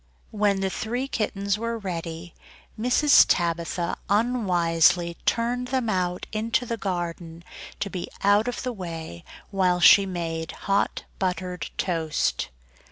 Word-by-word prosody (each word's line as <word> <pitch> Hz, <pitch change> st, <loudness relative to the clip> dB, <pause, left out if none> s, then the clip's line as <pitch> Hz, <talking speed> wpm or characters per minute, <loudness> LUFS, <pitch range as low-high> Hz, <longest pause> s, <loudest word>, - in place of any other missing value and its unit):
When 205 Hz, -2 st, +1 dB
the 190 Hz, -1 st, 0 dB
three 245 Hz, +7 st, -3 dB
kittens 200 Hz, -4 st, -1 dB
were 230 Hz, 0 st, -2 dB
ready, 170 Hz, -4 st, -6 dB, 0.4 s
Mrs. 250 Hz, +6 st, +5 dB
Tabitha 170 Hz, 0 st, 0 dB
unwisely 175 Hz, -6 st, +2 dB
turned 245 Hz, +2 st, 0 dB
them 255 Hz, -4 st, 0 dB
out 180 Hz, -2 st, -1 dB
into 225 Hz, +3 st, 0 dB
the 230 Hz, -, -2 dB
garden, 175 Hz, -4 st, -4 dB, 0.4 s
to -, -, 0 dB
be 180 Hz, -2 st, -4 dB, 0.2 s
out 205 Hz, +3 st, +4 dB
of 245 Hz, -, -3 dB
the 250 Hz, -1 st, -2 dB
way 165 Hz, -, -7 dB, 0.3 s
while 185 Hz, -2 st, +2 dB
she 195 Hz, +2 st, +7 dB
made 165 Hz, -3 st, -4 dB
hot 200 Hz, 0 st, -1 dB, 0.2 s
buttered 180 Hz, -2 st, -2 dB
toast. 160 Hz, -, -1 dB
190 Hz, 125 wpm, -25 LUFS, 170-220 Hz, 0.4 s, she